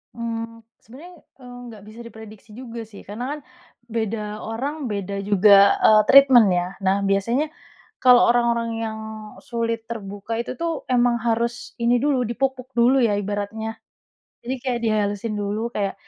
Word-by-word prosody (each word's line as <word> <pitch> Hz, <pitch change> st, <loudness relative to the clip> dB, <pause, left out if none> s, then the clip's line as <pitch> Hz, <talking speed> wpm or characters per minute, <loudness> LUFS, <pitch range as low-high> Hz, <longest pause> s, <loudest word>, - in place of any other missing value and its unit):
Mmm, 230 Hz, 0 st, -5 dB, 0.2 s
sebenarnya, 305 Hz, +10 st, -13 dB, 0.3 s
eee, 245 Hz, -1 st, -12 dB, 0.2 s
nggak 210 Hz, -2 st, -13 dB
bisa 220 Hz, +2 st, -13 dB
diprediksi 220 Hz, -2 st, -13 dB
juga 235 Hz, 0 st, -8 dB
sih. 215 Hz, -2 st, -14 dB
Karena 215 Hz, +4 st, -6 dB
kan 300 Hz, -, -5 dB, 0.5 s
beda 215 Hz, -2 st, -4 dB
orang, 260 Hz, +3 st, -4 dB
beda 200 Hz, 0 st, -4 dB
juga, 200 Hz, 0 st, +5 dB
eee, 215 Hz, -1 st, +6 dB
treatment 265 Hz, -5 st, +7 dB
ya. 175 Hz, 0 st, 0 dB, 0.2 s
Nah, 190 Hz, +1 st, +2 dB
biasanya, 230 Hz, +10 st, 0 dB, 0.6 s
kalau 250 Hz, -1 st, +7 dB
orang-orang 235 Hz, -1 st, +1 dB
yang 220 Hz, -1 st, -4 dB, 0.4 s
sulit 230 Hz, -1 st, -4 dB
terbuka 205 Hz, -1 st, -6 dB
itu 245 Hz, -, -7 dB
tuh, 335 Hz, -2 st, -3 dB
emang 245 Hz, -1 st, +3 dB
harus 235 Hz, +1 st, -2 dB
ini 235 Hz, +1 st, +2 dB
dulu, 260 Hz, -5 st, +1 dB
dipuk-puk 260 Hz, +1 st, -3 dB
dulu 250 Hz, +3 st, +4 dB
ya, 220 Hz, -4 st, +2 dB
ibaratnya. 205 Hz, +2 st, -4 dB, 0.7 s
Jadi 250 Hz, +3 st, -3 dB
kayak 245 Hz, -2 st, -3 dB
dihalusin 210 Hz, -1 st, -1 dB
dulu, 210 Hz, +3 st, -3 dB
kayak 200 Hz, -4 st, -2 dB
230 Hz, 145 wpm, -22 LUFS, 210-245 Hz, 0.7 s, treatment